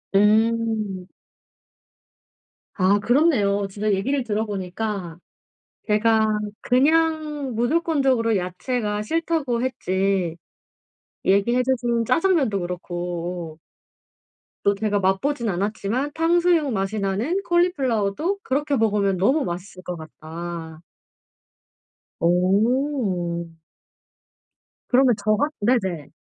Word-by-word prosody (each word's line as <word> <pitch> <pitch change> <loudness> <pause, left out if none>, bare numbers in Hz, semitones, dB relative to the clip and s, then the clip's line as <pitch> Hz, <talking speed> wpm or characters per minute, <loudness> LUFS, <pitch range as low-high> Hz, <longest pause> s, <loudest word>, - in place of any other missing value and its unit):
음. 215 -2 +2 1.7
아 195 +1 +3
그렇네요. 210 -7 +2
진짜 210 +2 -1
얘기를 260 +7 0
들어보니까 205 -4 -3 0.7
제가 215 0 +3 0.2
그냥 300 -1 +1
무조건적으로 260 -4 +1
야채가 210 +4 -2
싫다고 300 -2 -1
했지. 190 -7 -1 0.9
얘기해 220 +6 +3
주신 240 -2 0
짜장면도 270 - +2
그렇고 175 -2 -5 1.0
또 200 - +3
제가 205 0 0
맛보진 225 +6 0
않았지만 210 +8 -2
탕수육 335 -2 +2
맛이 200 0 -2
나는 225 - -1
콜리플라워도 325 - +1
그렇게 285 +1 0
먹으면 205 -4 +1
너무 265 - +2
맛있을 185 +1 -6
것 180 -1 -5
같다. 160 +1 -8 1.4
어. 185 - +1 1.4
그러면 255 -1 +4
저 215 +1 +1
같 290 +6 0
네네. 190 - 0
215 Hz, 210 characters per minute, -23 LUFS, 190-265 Hz, 1.7 s, 그러면